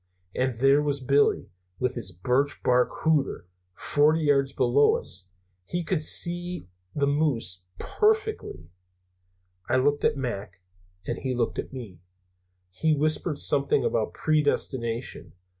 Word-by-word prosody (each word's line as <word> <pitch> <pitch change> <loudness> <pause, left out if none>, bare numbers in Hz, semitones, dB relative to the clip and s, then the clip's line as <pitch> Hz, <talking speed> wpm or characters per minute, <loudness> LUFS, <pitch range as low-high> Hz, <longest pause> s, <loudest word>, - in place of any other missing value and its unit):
And 130 -1 -1
there 135 +4 +4
was 145 -1 -1
Billy, 140 +2 +1 0.3
with 125 +3 -1
his 115 -7 -2
birch 125 +11 -1
bark 125 0 +3
hooter, 155 - +1 0.3
forty 155 +2 +2
yards 140 -2 +2
below 135 +2 +3
us 95 0 -5 0.4
he 175 - -3
could 170 -1 -1
see 175 - +1 0.3
the 145 - +1
moose 135 - 0
perfectly. 425 - -1 1.0
"I - - +2
looked 145 +3 +1
at - - +2
Mac, 100 -8 -5 0.5
and - - -3
he 130 -2 -2
looked 120 -2 -1
at - - -5
me. 115 -10 -9 0.7
He 155 - +1
whispered 155 +1 0
something 140 -1 +1
about 110 -2 -1
predestination. 130 - -1
135 Hz, 125 wpm, -26 LUFS, 120-150 Hz, 1.0 s, there